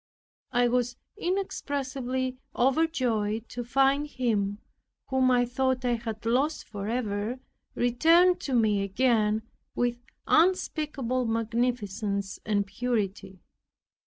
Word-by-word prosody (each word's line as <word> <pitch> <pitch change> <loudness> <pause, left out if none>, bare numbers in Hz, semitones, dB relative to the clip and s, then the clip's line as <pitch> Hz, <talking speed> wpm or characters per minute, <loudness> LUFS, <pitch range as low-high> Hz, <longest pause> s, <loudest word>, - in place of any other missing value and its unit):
I 245 0 +3
was 245 0 0 0.2
inexpressibly 265 -8 -2 0.2
overjoyed 245 -6 +1
to 245 - -5
find 275 +4 +2
Him, 215 -7 -1 0.5
whom 260 -1 +3
I 245 -1 +4
thought 260 +1 0
I 245 - +2
had 225 -2 -5
lost 270 +7 +1
forever, 210 +2 -3 0.4
returned 330 +9 +4
to 270 - -2
me 215 -4 +3
again 215 +1 +2 0.3
with 240 0 0 0.3
unspeakable 300 -7 +1
magnificence 225 -4 -1
and 205 -2 +1
purity. 200 -4 -3
245 Hz, 100 wpm, -28 LUFS, 215-260 Hz, 0.5 s, I